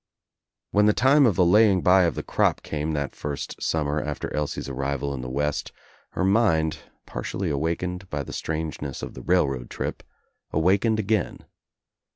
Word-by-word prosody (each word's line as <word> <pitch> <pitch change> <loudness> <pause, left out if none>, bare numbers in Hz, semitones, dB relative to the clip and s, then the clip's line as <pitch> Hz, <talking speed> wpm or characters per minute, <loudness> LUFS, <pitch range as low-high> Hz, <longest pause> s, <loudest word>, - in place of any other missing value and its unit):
When 105 +1 +4
the 105 - +5
time 135 +3 +5
of 105 - +2
the 90 - +4
laying 100 0 +5
by 90 0 +6
of 85 - 0
the - - -4
crop - - +1
came 75 +1 -3
that 70 -2 -3
first 75 -1 -5
summer 75 -1 0
after 75 -1 -4
Elsie's 75 -2 -2
arrival 70 +1 -2
in 65 - -5
the 65 - -5
West 75 +2 -2 0.4
her 95 - 0
mind, 95 -7 +2 0.3
partially 90 -4 -3
awakened 90 +5 -2
by 70 -1 -3
the - - -9
strangeness 75 -3 -4
of - - -6
the - - -9
railroad 70 -9 +1
trip, - - -4 0.5
awakened 100 +7 +2
again. 110 -2 -1
80 Hz, 165 wpm, -25 LUFS, 75-95 Hz, 0.5 s, by